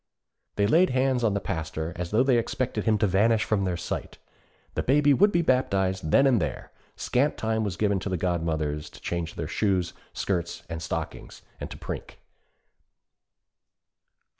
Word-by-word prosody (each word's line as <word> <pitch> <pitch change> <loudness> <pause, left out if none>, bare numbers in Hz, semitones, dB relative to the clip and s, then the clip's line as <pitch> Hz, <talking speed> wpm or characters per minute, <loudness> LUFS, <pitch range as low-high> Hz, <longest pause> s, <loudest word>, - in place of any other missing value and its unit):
They 100 - +2
laid 165 - +4
hands 130 -1 +1
on 105 -3 +2
the - - +1
Pastor, 80 -3 -4
as 90 -1 -4
though 110 +6 +3
they 130 -3 +4
expected 125 +2 -2
him 110 -2 +3
to 105 - +2
vanish 105 +4 +3
from 100 -3 0
their 90 -2 -1
sight. - - -5 0.6
The - - -1
Baby 145 +2 +4
would 200 +8 +5
be 170 -2 +2
baptized 95 - +1
then 135 - +5
and 125 -7 +4
there. - - -4 0.2
Scant 140 +4 0
time 110 0 0
was 95 -4 -3
given 100 -2 +1
to 95 - -4
the 95 - -1
godmothers 80 -4 -1
to - - -14
change 85 -2 -3
their - - -3
shoes, 95 -5 0 0.2
skirts, 85 -3 -2
and 80 0 -5
stockings, 80 - -5 0.2
and - - -5
to - - -8
prink. - - -7
100 Hz, 170 wpm, -26 LUFS, 85-125 Hz, 0.6 s, would